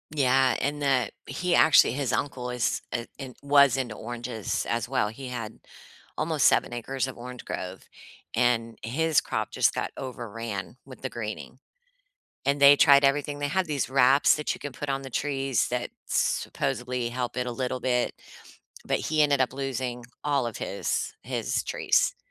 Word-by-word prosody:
Yeah, 130 Hz, -2 st, +3 dB
and 145 Hz, +1 st, -1 dB
that 130 Hz, -3 st, +2 dB
he 180 Hz, 0 st, -2 dB
actually 160 Hz, -7 st, +6 dB
his 130 Hz, -3 st, -1 dB
uncle 125 Hz, +1 st, -2 dB
is 125 Hz, -1 st, -1 dB
i 120 Hz, 0 st, -3 dB
in 130 Hz, -3 st, -8 dB
was 140 Hz, -2 st, +5 dB
into 120 Hz, -5 st, -3 dB
oranges 120 Hz, -2 st, -4 dB
as 115 Hz, 0 st, -1 dB
well. 125 Hz, -6 st, 0 dB
He 130 Hz, +4 st, -8 dB
had 115 Hz, -3 st, -6 dB, 0.6 s
almost -, -, +1 dB
7 -, -, +4 dB
acres 130 Hz, +3 st, -2 dB
of 130 Hz, -, -8 dB
orange 125 Hz, +1 st, -8 dB
grove, 90 Hz, +1 st, -6 dB, 0.5 s
and 115 Hz, -1 st, +1 dB
his 155 Hz, +6 st, +2 dB
crop -, -, -3 dB
just -, -, +2 dB
got -, -, -3 dB
overran 115 Hz, -4 st, -6 dB
with 130 Hz, -2 st, -13 dB
the 130 Hz, -, -3 dB
greening, 120 Hz, +2 st, -6 dB, 0.9 s
and 140 Hz, +1 st, +1 dB
they 140 Hz, 0 st, +9 dB
tried 140 Hz, 0 st, +7 dB
everything. 145 Hz, +1 st, +1 dB
They 145 Hz, 0 st, -1 dB
have 185 Hz, +3 st, 0 dB
these 145 Hz, -3 st, -1 dB
wraps 135 Hz, +1 st, +5 dB
that 150 Hz, -, -1 dB
you -, -, -12 dB
can 145 Hz, -2 st, -6 dB
put 145 Hz, +2 st, -5 dB
on 135 Hz, 0 st, -1 dB
the 135 Hz, -, -7 dB
trees 135 Hz, -1 st, 0 dB
that 125 Hz, 0 st, -2 dB, 0.2 s
supposedly 125 Hz, 0 st, -1 dB
help 125 Hz, 0 st, -4 dB
it 125 Hz, -, -1 dB
a 125 Hz, -, -3 dB
little 125 Hz, +1 st, -3 dB
bit, 125 Hz, -1 st, +1 dB, 0.7 s
but -, -, 0 dB
he 155 Hz, -1 st, +1 dB
ended 145 Hz, -2 st, +3 dB
up 130 Hz, -, +1 dB
losing 130 Hz, -3 st, -3 dB, 0.2 s
all 140 Hz, -4 st, +1 dB
of 115 Hz, -, -6 dB
his -, -, -2 dB
his -, -, -2 dB
trees, -, -, +1 dB
130 Hz, 170 wpm, -27 LUFS, 120-140 Hz, 0.9 s, they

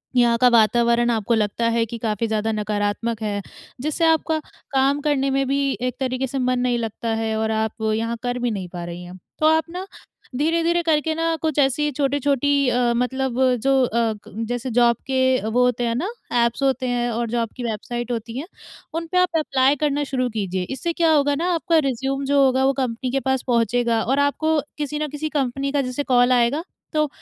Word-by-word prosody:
यहाँ 235 Hz, -1 st, +4 dB
का 250 Hz, -, +7 dB
वातावरण 235 Hz, +1 st, +3 dB
आपको 225 Hz, +1 st, 0 dB
लगता 215 Hz, +2 st, 0 dB
है 230 Hz, 0 st, +1 dB
कि 230 Hz, +1 st, -7 dB
काफ़ी 225 Hz, 0 st, -1 dB
ज़्यादा 220 Hz, 0 st, -1 dB
नकारात्मक 210 Hz, +1 st, -2 dB
है, 205 Hz, -1 st, -2 dB, 0.4 s
जिससे 310 Hz, +3 st, 0 dB
आपका 320 Hz, 0 st, +2 dB, 0.3 s
काम 275 Hz, +1 st, +2 dB
करने 275 Hz, -2 st, +1 dB
में 270 Hz, 0 st, +1 dB
भी 275 Hz, +1 st, +1 dB, 0.2 s
एक 250 Hz, -1 st, -1 dB
तरीके 260 Hz, 0 st, -1 dB
से 270 Hz, +2 st, -3 dB
मन 255 Hz, 0 st, +1 dB
नहीं 245 Hz, -1 st, +1 dB
लगता 225 Hz, 0 st, -4 dB
है 220 Hz, -1 st, -1 dB
और 220 Hz, 0 st, 0 dB
आप 220 Hz, 0 st, 0 dB, 0.2 s
यहाँ 230 Hz, +1 st, -2 dB
कर 245 Hz, 0 st, -2 dB
भी 245 Hz, -1 st, 0 dB
नहीं 190 Hz, -4 st, -4 dB
पा 175 Hz, -1 st, -5 dB
रही 175 Hz, +1 st, -7 dB
हैं, 180 Hz, +1 st, -10 dB, 0.2 s
तो 310 Hz, -, +2 dB
आप 320 Hz, 0 st, +4 dB
ना 365 Hz, +2 st, -5 dB, 0.5 s
धीरे-धीरे 335 Hz, +4 st, +1 dB
करके 315 Hz, -1 st, +1 dB
ना 330 Hz, 0 st, 0 dB
कुछ 310 Hz, -2 st, 0 dB
ऐसी 290 Hz, +2 st, +2 dB
छोटे-छोटी 280 Hz, 0 st, +1 dB
अ, 245 Hz, -1 st, +2 dB
मतलब 260 Hz, 0 st, -1 dB, 0.2 s
जो 270 Hz, 0 st, +3 dB
अ, -, -, -4 dB, 0.4 s
क -, -, -12 dB, 0.2 s
जैसे 245 Hz, +1 st, -3 dB
जॉब 235 Hz, 0 st, +4 dB
के 260 Hz, -1 st, +2 dB
वो 245 Hz, +3 st, +2 dB
होते 245 Hz, -1 st, 0 dB
हैं 230 Hz, -, 0 dB
ना, 335 Hz, +10 st, -1 dB, 0.4 s
ऐप्स 235 Hz, +4 st, -2 dB
होते 260 Hz, -1 st, +1 dB
हैं 245 Hz, 0 st, 0 dB
और 235 Hz, 0 st, -2 dB
जॉब 230 Hz, -1 st, -1 dB
की 245 Hz, -, -5 dB
वेबसाइट 240 Hz, +2 st, -4 dB
होती 230 Hz, +1 st, -4 dB
हैं 320 Hz, -, -6 dB, 0.5 s
उन 330 Hz, 0 st, -3 dB
पे 365 Hz, -, +1 dB
आप 360 Hz, -2 st, +2 dB
एप्लाई 275 Hz, -2 st, +2 dB
करना 290 Hz, 0 st, 0 dB
शुरू 260 Hz, -2 st, -1 dB
कीजिए। 190 Hz, -4 st, -2 dB
इससे 335 Hz, +5 st, -3 dB
क्या 330 Hz, -1 st, +2 dB
होगा 290 Hz, -1 st, +3 dB
ना 335 Hz, +4 st, -2 dB
आपका 330 Hz, 0 st, +1 dB
रिज्यूम 270 Hz, +2 st, -1 dB
जो 280 Hz, 0 st, +3 dB
होगा, 260 Hz, 0 st, +2 dB
वो 275 Hz, -, +3 dB
कंपनी 255 Hz, -1 st, -2 dB
के 270 Hz, -, +1 dB
पास 265 Hz, -1 st, -1 dB
पहुँचेगा 235 Hz, -1 st, +2 dB
और 270 Hz, +4 st, +1 dB
आपको 310 Hz, +2 st, +1 dB, 0.2 s
किसी 295 Hz, 0 st, -3 dB
ना 305 Hz, -, -1 dB
किसी 300 Hz, +2 st, -4 dB
कंपनी 275 Hz, -1 st, -1 dB
का 285 Hz, -1 st, +1 dB
जैसे 255 Hz, +2 st, -3 dB
कॉल 245 Hz, -1 st, +3 dB
आएगा, 250 Hz, +6 st, +2 dB, 0.3 s
तो 305 Hz, -1 st, +2 dB
255 Hz, 205 wpm, -22 LUFS, 235-285 Hz, 0.5 s, का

